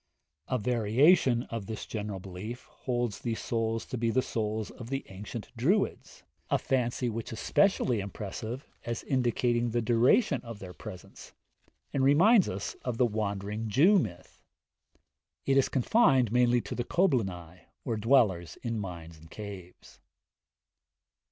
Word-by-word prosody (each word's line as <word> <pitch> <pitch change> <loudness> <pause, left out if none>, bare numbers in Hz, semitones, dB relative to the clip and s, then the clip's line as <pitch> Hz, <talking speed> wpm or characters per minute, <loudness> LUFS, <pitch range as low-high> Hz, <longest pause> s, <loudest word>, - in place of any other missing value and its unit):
A 130 - 0
variation 120 - +3
of 115 -4 -4
this 110 - -5
general 105 -3 -4
belief 95 +6 -7
holds 120 -4 -3
these 115 -2 -3
souls 115 -1 -1
to 125 - -5
be 115 0 +1
the 130 +3 +2
souls 110 -1 -3
of 120 -1 -10
the 135 0 -3
ancient 105 +4 -8
Druids, 180 - 0 0.3
a - - +3
fancy 125 -1 0
which 115 +1 -4
is 110 - -6
specially 160 - +2
impressive, 110 +5 -6 0.2
as 115 -1 -4
indicating 120 -2 +1
the 120 +1 0
duration 120 - +3
of 115 -3 -8
their 95 -3 -9
penance, 90 +3 -11 0.6
and 135 - +1
reminds 180 - +5
us 95 +2 -4
of 125 -3 -3
the 125 - +4
Wandering 105 0 -3
Jew 175 - +5
myth. 90 - -6 1.0
It 135 - +2
is 135 - +3
confined 135 - +3
mainly 120 0 +3
to - - -6
the 120 - -2
Coblynau, 95 - 0 0.3
or 115 - -1
dwellers 105 -7 +2
in 115 -2 -2
mines 85 -5 -7
and 80 +1 -16
caves. 100 -4 -10
115 Hz, 145 wpm, -29 LUFS, 105-125 Hz, 1.0 s, reminds